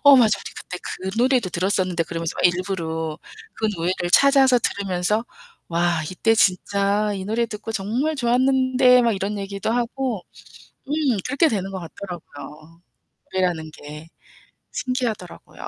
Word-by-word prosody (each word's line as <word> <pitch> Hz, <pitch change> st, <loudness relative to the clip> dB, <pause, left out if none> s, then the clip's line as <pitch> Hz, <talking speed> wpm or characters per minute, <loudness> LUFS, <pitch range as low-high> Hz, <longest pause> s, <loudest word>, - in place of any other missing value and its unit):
"어, 285 Hz, -2 st, +9 dB
맞아, 215 Hz, -5 st, +4 dB
우리 -, -, -9 dB
그때 180 Hz, -, -7 dB
그 190 Hz, +1 st, -5 dB
노래도 245 Hz, -4 st, +3 dB
들었었는데." 185 Hz, -1 st, 0 dB
그러면서 165 Hz, 0 st, -4 dB
막 -, -, -2 dB
일부러 170 Hz, -3 st, 0 dB, 0.4 s
그 220 Hz, -, -1 dB
노래를 175 Hz, +1 st, -1 dB
찾아서 270 Hz, -1 st, +6 dB
들으면서 200 Hz, +1 st, -1 dB, 0.4 s
"와 170 Hz, -1 st, +1 dB
이때 225 Hz, +5 st, +2 dB
진짜 200 Hz, +1 st, +2 dB
이 190 Hz, -1 st, -5 dB
노래 230 Hz, +3 st, 0 dB
듣고 215 Hz, 0 st, -7 dB
정말 230 Hz, +9 st, -1 dB
좋았는데." 255 Hz, 0 st, +4 dB
막 230 Hz, -1 st, +3 dB
이런 200 Hz, +2 st, -3 dB
얘기도 200 Hz, +2 st, -3 dB
하고 240 Hz, -3 st, -1 dB, 0.6 s
음 -, -, -3 dB, 0.3 s
그렇게 280 Hz, +5 st, +3 dB
되는 195 Hz, -5 st, -2 dB
것 190 Hz, -, -5 dB
같더라고요 165 Hz, -3 st, -10 dB, 0.5 s
노래라는 175 Hz, -4 st, 0 dB
게. 150 Hz, +2 st, -10 dB, 0.6 s
신기하더라고요. 250 Hz, -8 st, -4 dB
200 Hz, 320 characters per minute, -22 LUFS, 175-240 Hz, 0.6 s, 어